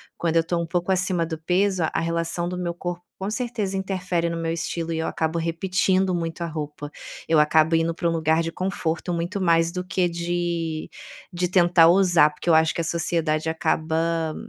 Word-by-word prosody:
Quando 165 -1 -1
eu 165 - +4
tô 170 +1 -1
um - - -2
pouco 175 +2 -1
acima 185 -2 +1
do 160 -1 -5
peso, 185 +3 +1
a - - -1
relação 170 +1 -2
do 180 0 -4
meu 175 -1 -2
corpo 175 0 -5 0.2
com 190 +1 -3
certeza 225 -5 -2
interfere 185 -3 -1
no 170 - -3
meu 165 0 -2
estilo 165 0 -3
e 160 - -2
eu 160 - -1
acabo 160 +1 -1
repetindo 185 +3 +1
muito 165 0 -4
a - - -1
roupa. 150 -2 -6 0.4
Eu 160 -1 +4
acabo 155 +2 +4
indo 165 +1 +1
pra 170 - -1
um - - +2
lugar 160 0 +2
de 165 - -3
conforto, 180 -2 -2
muito 175 +4 -2
mais 165 -2 +3
do 180 +1 -4
que 180 0 0
de 170 -2 -2 0.5
de 180 +1 0
tentar 175 -2 +5
ousar, 175 -4 +5
porque 150 +3 -12
eu - - +6
acho 160 0 +3
que - - -1
a - - -2
sociedade 165 -1 -1
acaba 160 0 0
170 Hz, 205 wpm, -24 LUFS, 165-180 Hz, 0.5 s, eu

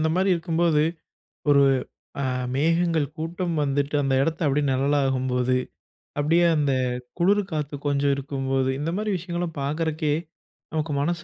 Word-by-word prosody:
இந்தமாரி 175 +5 +2
இருக்கும்போது 165 -2 +1 0.7
ஒரு 140 -1 +6 0.6
அ - - 0 0.3
மேகங்கள் 165 +1 +2
கூட்டம் 170 +2 -2
வந்துட்டு 145 +1 0
அந்த 135 -1 +1
இடத்த 160 +3 -1
அப்பிடியே 145 +1 +1
நிழலாகும்போது, 130 -2 +1 0.6
அப்பிடியே 165 +4 +3
அந்த 145 -2 +2 0.5
குளிர் 200 +4 +3
காத்து 150 -2 -3
கொஞ்சம் 140 0 +2
இருக்கும்போது, 135 -1 -1
இந்த 150 - -2
மாதிரி 210 -1 -1
விஷயங்கள்லாம் 175 -2 -4
பார்க்கறக்கே 155 +1 -1 0.6
நமக்கு 155 -1 -2
மனசு 170 +3 -1
150 Hz, 125 wpm, -24 LUFS, 140-170 Hz, 0.7 s, ஒரு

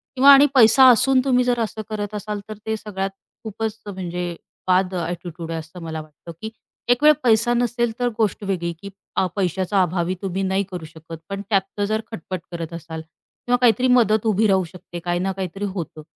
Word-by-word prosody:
किंवा 275 +2 +8
आणि 280 +1 +8
पैसा 255 +2 +7
असून 255 +2 +5
तुम्ही 250 -2 +3
जर 245 -1 +1
असं 220 -1 -2
करत 210 -1 -4
असाल 210 0 -4
तर 215 - -6
ते 220 - -1
सगळ्यात 195 -2 -4 0.3
खूपच 220 0 -4
म्हणजे 180 -3 -4 0.3
बाद 185 0 +2
ॲटिट्यूड 170 -1 -5
आहे 165 - -2
असं 160 +3 -11
मला 160 -1 -5
वाटतं, 155 +2 -13
की 220 - -4 0.4
एकवेळ 290 +5 +6
पैसा 230 0 +4
नसेल 240 -1 0
तर 245 0 +1
गोष्ट 215 -2 0
वेगळी 175 -3 -2
की 200 - -7 0.5
पैशाचा 190 +1 +1
अभावी 175 +1 0
तुम्ही 195 0 -2
नाही 190 +1 +1
करू 175 -3 -6
शकत 160 +1 -11
पण 195 0 -4
त्यातनं 200 0 0
जर 215 +1 -1
खटपट 185 -2 -5
करत 170 -1 -5
असाल 160 -1 -7
किंवा 245 +9 -4
काहीतरी 245 +1 +4
मदत 230 -3 +3
उभी 215 +1 +3
राहू 190 -1 +3
शकते, 175 0 -9
काही 175 +1 -2
ना 190 +1 -1
काहीतरी 190 +1 -4
होतं. 180 -5 -5
195 Hz, 185 wpm, -22 LUFS, 175-220 Hz, 0.5 s, किंवा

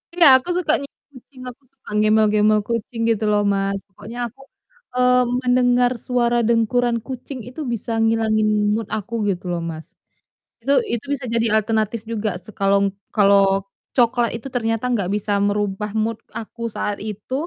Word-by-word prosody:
Iya, 350 - +5
aku 305 - -10
suka 315 -4 +1
nyium 280 - -11
kucing, 255 0 -15
aku 245 - -13
suka - - -17
gembal-gembol 215 0 +4
kucing 230 +1 -4
gitu 220 -1 -1
loh, 205 0 +2
Mas. 195 -1 0
Pokoknya 230 +5 -10
aku, 270 +3 -20 0.5
eee, 250 0 +4 0.2
mendengar 245 0 +3
suara 240 0 +1
dengkuran 235 +1 +2
kucing 260 +1 -7
itu 250 +7 -8
bisa 235 -1 -3
ngilangin 225 -1 +2 0.3
mood 220 -1 -2
aku, 215 +1 -3
gitu 185 -1 -3
loh, 175 - -1
Mas, 165 -1 -6 0.8
itu 275 +5 +1 0.2
itu 235 +2 -3
bisa 265 -2 -4
jadi 230 0 +1
alternatif 220 0 0
juga 220 -1 -1
se 185 - -14
kalau 200 -1 +2 0.2
kalau 195 -1 +4 0.3
coklat 240 -1 +2
itu 235 +4 -6
ternyata 225 -1 -1
nggak 205 -7 0
bisa 205 0 0
merubah 205 0 -1
mood 220 0 -1 0.2
aku 230 +1 -6
saat 205 -1 -2
itu, 210 +3 -7
225 Hz, 160 wpm, -21 LUFS, 205-245 Hz, 0.8 s, Iya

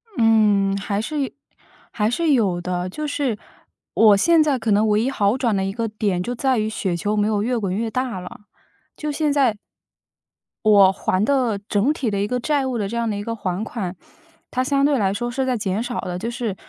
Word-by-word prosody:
嗯， 210 -4 +3
还 200 +1 -2
是 300 +6 -3
有 270 - -1 0.6
还 215 -1 0
是 315 +6 +1
有 200 -9 +2
的。 180 0 -2
就 305 +11 -5
是， 280 -6 -1 0.6
我 210 -3 +6
现 330 +8 +4
在 290 -3 +1
可 225 -2 -2
能 210 +2 +3
唯 210 0 +2
一 250 - 0
好 215 -2 +1
转 235 -5 +1
的 190 - 0
一 195 - -2
个 230 0 -2
点， 205 -4 -1
就 245 - -3
在 260 +1 +1
于 215 0 0
雪 195 -4 -2
球 205 +5 -1
没 205 - +2
有 210 -2 0
越 245 +1 0
滚 195 -4 -2
越 225 +2 -1
大 255 -6 -2
了， 180 +3 -10 0.5
就 300 -1 -4
现 300 0 0
在 260 -7 +2 1.1
我 200 -3 +7
还 190 0 -1
的 250 -4 +1
整 220 +9 +2
体 260 -6 -2
的 200 - -1
一 200 - 0
个 250 +3 -1
债 285 +1 0
务 255 -2 -2
的 205 -3 -1
这 235 +3 -4
样 230 -1 0
的 210 - -2
一 205 - -4
个 230 +1 -4
还 190 -1 -3
款， 195 -6 -5 0.6
它 255 - 0
相 275 +1 +1
对 285 -2 +3
来 195 -3 +1
说 240 +4 -3
是 265 +2 -2
在 255 -2 0
减 200 0 -2
少 245 0 -3
的。 180 -1 -4
就 230 +5 -4
是 235 -5 -3
220 Hz, 245 characters per minute, -21 LUFS, 200-255 Hz, 1.1 s, 我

